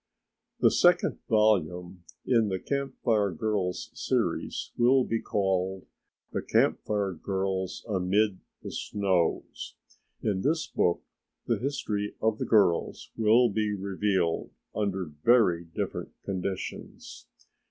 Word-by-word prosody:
The - - +6
second 175 0 +3
volume 90 -5 +1 0.2
in 115 -4 +3
the 95 -2 -1
Camp 140 +6 -3
Fire 105 -4 +3
Girls' 95 +1 -2
Series - - -1
will 125 +2 +4
be 115 -2 -1
called 95 -1 -1 0.5
"The - - -2
Camp - - +2
Fire 100 -2 0
Girls 95 +1 -3
Amid 100 0 +1 0.2
the - - -6
Snows." 95 -5 -1 0.5
In 95 -3 0
this 160 - +1
book 85 -1 0 0.4
the - - 0
history 105 -6 -2
of 110 -1 0
the - - -1
girls 100 -6 +2
will 115 +3 +5
be 105 0 0
revealed 95 -3 0 0.2
under 95 -3 -1
very 85 +3 +3
different 80 - -4 0.2
conditions. 95 0 -5
100 Hz, 115 wpm, -28 LUFS, 95-110 Hz, 0.5 s, The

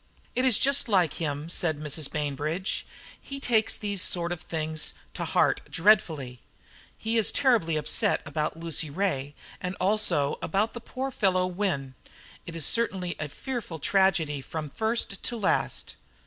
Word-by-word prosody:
"It 255 +1 +1
is 255 -5 +6
just 275 -2 +3
like 180 -7 +3
him," 145 -1 -2
said 165 -3 0
Mrs. 150 -1 -1
Bainbridge; 150 +5 -2 0.3
"he 275 0 -7
takes 225 -5 +2
these 205 -3 -1
sort 175 -1 0
of 175 - -4
things 155 -1 -3 0.2
to - - -3
heart - - +2
dreadfully. 160 - +2 0.6
He 225 +1 +1
is 215 - +3
terribly 220 - +3
upset 150 - +2
about 155 +1 -2
Lucy 165 -2 -1
Ray, 145 -5 -1 0.3
and 180 +1 -3
also 190 -8 +2
about 210 +3 0
the 240 - -7
poor 265 +3 -4
fellow 185 -6 +2
Wynne. 175 -8 -2 0.5
It 165 - -7
is 165 - 0
certainly 190 -7 +1
a 155 - -3
fearful 240 - -5
tragedy 160 -4 +2
from 155 +1 -5
first 220 -3 0
to 240 - -2
last." 215 - 0
175 Hz, 150 wpm, -27 LUFS, 155-215 Hz, 0.6 s, is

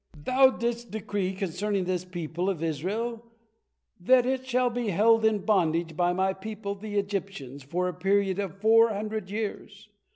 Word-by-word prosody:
Thou 255 - +4
didst 235 -1 -3
decree 205 -3 -2
concerning 195 +2 -2
this 180 0 -2
people 175 0 -3
of 170 -5 -3
Israel 210 - -2 0.8
that 250 +7 +4
is 260 0 -2
hall 250 0 +2
be 240 -1 -2
held 220 +4 +4
in 215 -3 +2
bondage 170 -5 +1
by 175 +1 +2
my 190 +1 +1
people, 200 +1 -6
the 205 +1 -6
Egyptians, 195 -9 -4
for 175 +7 -2
a 180 - -3
period 195 +2 +1
of 195 -1 -4
four 225 +2 +5
hundred 215 -1 -4
years. 210 0 -5
200 Hz, 160 wpm, -27 LUFS, 180-220 Hz, 0.8 s, four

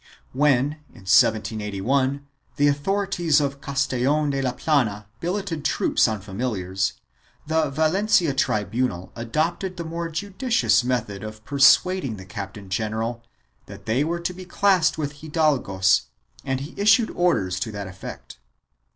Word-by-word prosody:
When, 145 +1 +2
in 105 -6 -17
1781, 110 +7 +2 0.3
the 145 - +3
authorities 175 +1 +1
of 140 -1 -2
Castellon 140 +2 0
de 135 -1 -1
la 130 -2 -1
Plana 125 -8 0
billeted 175 -3 -3
troops - - +2
on 110 -4 -3
famil 110 +3 -3
iars, 95 +2 -1 0.5
the 160 -1 +1
Valencia 165 +3 +2
tribunal 105 -5 -1
adopted 160 +10 -2
the 170 - -4
more 165 +1 -4
judicious 205 - +1
method 115 -5 -2
of 110 0 -9
persuading 140 0 +4
the 95 - -10
captain 100 +1 -8
general 110 +3 -2 0.5
that - - -11
they 120 +6 +1
were 170 +3 -2
to 170 +1 -3
be 185 +1 -9
classed 185 -4 +2
with 145 -2 -4
hidalgos 145 - +2 0.4
and 135 -1 -2
he 145 +4 -7
issued 220 +2 +4
orders 100 - +1
to 110 +4 -3
that 100 -1 -5
effect. 95 0 -10
140 Hz, 135 wpm, -23 LUFS, 110-160 Hz, 0.5 s, persuading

